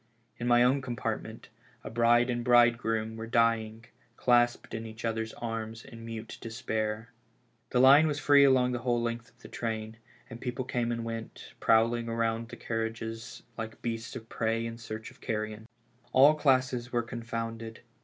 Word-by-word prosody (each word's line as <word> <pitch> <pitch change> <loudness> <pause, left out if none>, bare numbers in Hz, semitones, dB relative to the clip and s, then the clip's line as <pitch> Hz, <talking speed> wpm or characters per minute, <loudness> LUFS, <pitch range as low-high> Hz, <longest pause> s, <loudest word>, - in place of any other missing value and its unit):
In 120 - -2
my 120 0 +5
own 130 +3 +3
com 125 -2 -4
partment - - -5 0.3
a - - -7
bride 120 +2 +4
and 120 0 -2
bridegroom 115 -2 +3
were 115 0 -6
dying, 115 -1 +1 0.3
clasped 120 -1 +2
in 115 0 -4
each 110 +1 -8
other's 110 0 -2
arms 115 -1 -5
in 115 0 -11
mute 115 -1 -7
despair. 110 0 -3 0.6
The 125 - +1
line 140 +5 +8
was 150 -2 -1
free 145 -1 +6
along 130 -2 +4
the 125 - -2
w^hole 120 0 0
length 115 0 -3
of - - -31
the - - -9
train, 110 -1 -4 0.3
and 115 +2 -10
people 125 0 -3
came 120 -2 -1
and 115 -1 -3
went, 115 0 -7
prowling 115 +1 +3
round 115 0 -1
the - - -8
carriages 115 +1 -4 0.2
like 110 0 -6
beasts 115 -1 -4
of 110 - -8
prey 115 0 -1
in 115 0 -6
search 110 -1 -7
of - - -22
carrion. 110 0 -4 0.5
All 140 +4 +7
classes 130 -4 +1
were 120 -1 +1
confounded. 115 -1 -5
115 Hz, 170 wpm, -29 LUFS, 115-120 Hz, 0.6 s, line